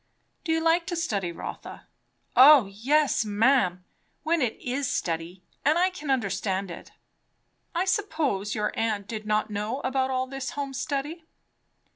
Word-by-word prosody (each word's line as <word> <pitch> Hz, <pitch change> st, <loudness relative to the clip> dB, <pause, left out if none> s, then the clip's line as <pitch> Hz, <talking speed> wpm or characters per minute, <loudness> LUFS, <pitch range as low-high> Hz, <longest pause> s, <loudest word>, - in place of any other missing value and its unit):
"Do 335 Hz, -, -2 dB
you 325 Hz, 0 st, +2 dB
like 330 Hz, +1 st, +2 dB
to 355 Hz, -, -2 dB
study, 205 Hz, -, -1 dB
Rotha?" 170 Hz, -, -8 dB, 0.5 s
"O 275 Hz, -2 st, +9 dB
yes, 255 Hz, +8 st, +1 dB
ma'am! 205 Hz, -4 st, +2 dB, 0.4 s
when 330 Hz, +1 st, +1 dB
it 240 Hz, -4 st, -1 dB
is 260 Hz, +2 st, -2 dB
study, 170 Hz, +2 st, -3 dB, 0.2 s
and 305 Hz, +3 st, +3 dB
I 365 Hz, +2 st, +3 dB
can 310 Hz, -5 st, -8 dB
understand 200 Hz, -6 st, -1 dB
it." -, -, -10 dB, 0.8 s
"I 355 Hz, +2 st, +1 dB
suppose 315 Hz, -, -1 dB
your 210 Hz, -1 st, -1 dB
aunt 215 Hz, -3 st, -1 dB
did 215 Hz, -2 st, -6 dB
not 215 Hz, 0 st, 0 dB
know 210 Hz, +5 st, -2 dB
about 260 Hz, 0 st, 0 dB
all 255 Hz, 0 st, 0 dB
this 270 Hz, 0 st, -5 dB
home 280 Hz, -1 st, -3 dB
study?" 290 Hz, +5 st, -3 dB
260 Hz, 150 wpm, -26 LUFS, 205-305 Hz, 0.8 s, O